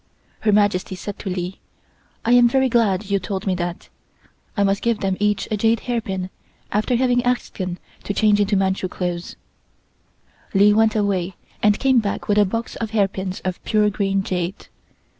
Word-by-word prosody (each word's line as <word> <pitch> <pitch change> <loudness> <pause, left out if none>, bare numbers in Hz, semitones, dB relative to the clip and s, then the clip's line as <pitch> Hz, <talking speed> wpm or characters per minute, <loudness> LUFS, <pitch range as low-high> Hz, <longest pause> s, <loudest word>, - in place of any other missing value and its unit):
Her 215 - +2
Majesty 205 -2 +2
said 200 +2 -7
to 195 - -5
Li: 180 0 -4 0.7
"I 235 - +2
am 245 -1 +7
very 265 +1 +2
glad 210 -4 +1
you 200 - +3
told 190 0 -4
me 190 - +1
that. 175 -1 -4 0.7
I 200 - +3
must 195 0 +1
give 235 -2 +1
them 190 -1 0
each 205 0 +1
a 215 - +1
jade 225 +2 +2
hairpin 190 -6 -3 0.4
after 215 +4 +1
having 245 0 +2
asked 245 -3 -1
them 180 -2 -3 0.3
to - - -2
change 210 -2 +4
into 205 0 +2
Manchu 190 0 0
dress." 175 -1 -4 1.2
Li 205 +1 +6
went 220 0 +3
away 195 -3 0 0.3
and 210 0 +4
came 265 -2 +3
back 205 -3 -3
with 210 0 +3
a 205 - +5
box 230 +4 -3
of 225 - -3
hairpins 195 -3 -1
of 185 -1 -4
pure 210 -1 +2
green 195 -1 0
jade. 180 0 -3
205 Hz, 180 wpm, -21 LUFS, 190-220 Hz, 1.2 s, am